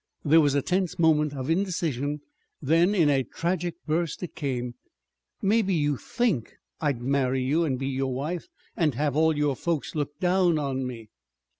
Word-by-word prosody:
There 160 +2 +6
was 145 -2 +2
a 140 - +1
tense 185 -1 0
moment 150 -3 +3
of 130 -1 -4
indecision. 160 -6 -1 0.4
Then 165 +7 +3
in 165 -6 +4
a 140 -2 +3
tragic 170 +6 -2
burst 165 +2 -1
it 175 - -6
came. 125 -4 -3 0.7
"Maybe 200 -2 +2
you 145 -2 +1
think 190 - -1 0.2
I'd 140 -6 -1
marry 130 -1 +1
you, 155 +6 +2
and 135 -4 -1
be 135 +1 -2
your 135 0 -1
wife, 150 +7 -3 0.3
and 155 -7 +1
have 145 +1 0
all 160 0 +3
your 145 -2 +1
folks 165 +1 -2
look 145 -1 -3
down 180 -2 +3
on 135 -3 -2
me!" 115 -4 -8
150 Hz, 170 wpm, -26 LUFS, 135-170 Hz, 0.7 s, There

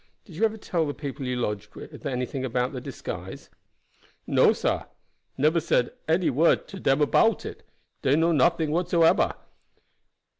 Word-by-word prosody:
Did 175 - -13
you 215 +7 +2
ever 220 0 -1
tell 170 -6 -1
the 145 - -4
people 140 -2 -6
you 125 - -1
lodged 105 -4 -4
with - - -8
anything 130 +1 -3
about 125 +1 -1
the 130 - -5
disguise?" - - -7 0.7
"No, - - +4
sah, - - -1 0.5
neber 155 +5 +3
said 135 -6 +1 0.2
one 165 0 +2
word 165 +4 +3
to 195 - -8
dem 135 -3 +2
about 225 +8 +3
it; - - -7 0.4
dey 135 - +3
know 165 +2 +3
nothing 160 +1 +2
whatsoeber. 170 0 +3
150 Hz, 155 wpm, -26 LUFS, 130-170 Hz, 0.7 s, No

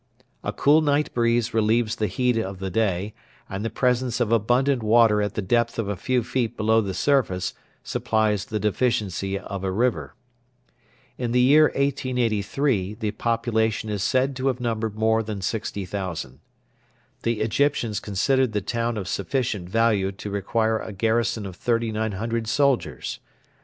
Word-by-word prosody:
A - - -2
cool 150 +3 +4
night 150 0 +1
breeze 115 0 +1
relieves 110 +1 +2
the 105 - 0
heat 125 +6 +1
of 95 -4 -2
the 95 0 -4
day, 100 -1 0 0.3
and 100 +2 -5
the 115 - -1
presence 125 +1 0
of 115 -3 0
abundant 120 +4 +2
water 110 -1 +4
at 105 0 -2
the 105 - -2
depth 115 +4 +1
of 115 -3 -1
a 100 - -2
few 125 +7 0
feet 120 -1 -2
below 110 +1 +3
the 95 -3 -4
surface 100 -11 +1 0.3
supplies 110 -2 0
the 110 - -3
deficiency 100 -4 0
of 100 -1 -6
a 95 - 0
river. 120 +6 -1 1.0
In 120 -2 -2
the 125 - +4
year 145 +5 +6
1883 125 -5 0
the 110 -1 -2
population 110 -2 0
is 105 -2 -2
said 130 +5 +1
to 130 +1 -1
have 130 -2 0
numbered 110 -3 -2
more 110 +1 +2
than 105 -2 -5
60,000. 95 - -4 0.8
The 115 -2 -1
Egyptians 115 -2 +1
considered 115 +5 +1
the 105 - 0
town 115 +3 -2
of 95 -3 -4
sufficient 100 -1 -2
value 105 -3 +2
to 100 +1 -7
require 110 +3 0
a 110 - -7
garrison 115 +1 0
of 95 -2 -7
3,900 115 -1 -1
soldiers. 120 - 0
110 Hz, 155 wpm, -24 LUFS, 100-120 Hz, 1.0 s, year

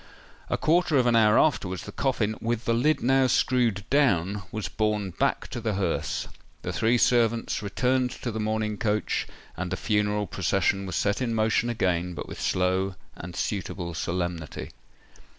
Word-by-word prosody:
A - - +1
quarter 165 -1 +3
of 125 - +3
an 120 -1 +3
hour 110 -1 +5
afterwards, 95 - +1
the - - -8
coffin, 115 -5 0
with 115 0 -2
the 115 - +2
lid 150 +7 +2
now 135 +1 +4
screwed 120 -6 +1
down, 105 - +2
was 110 -1 -3
borne 105 -3 -1
back - - 0
to - - -5
the 110 - -1
hearse;—the 95 -4 -4
three 115 +2 +2
servants 115 -2 +2
returned 125 +5 +1
to 120 - -5
the 110 - -4
mourning 110 0 -1
coach, 105 -3 0 0.3
and 90 +1 -4
the 95 - -1
funeral 105 -1 0
procession 95 +1 0
was 95 - -4
set 105 +4 0
in 115 -3 0
motion 110 +2 +2
again—but 90 -6 -1
with - - -8
slow 95 +1 +1 0.2
and 85 0 -8
suitable 90 -4 -3
solemnity. 85 -2 -3
105 Hz, 160 wpm, -26 LUFS, 95-120 Hz, 0.3 s, hour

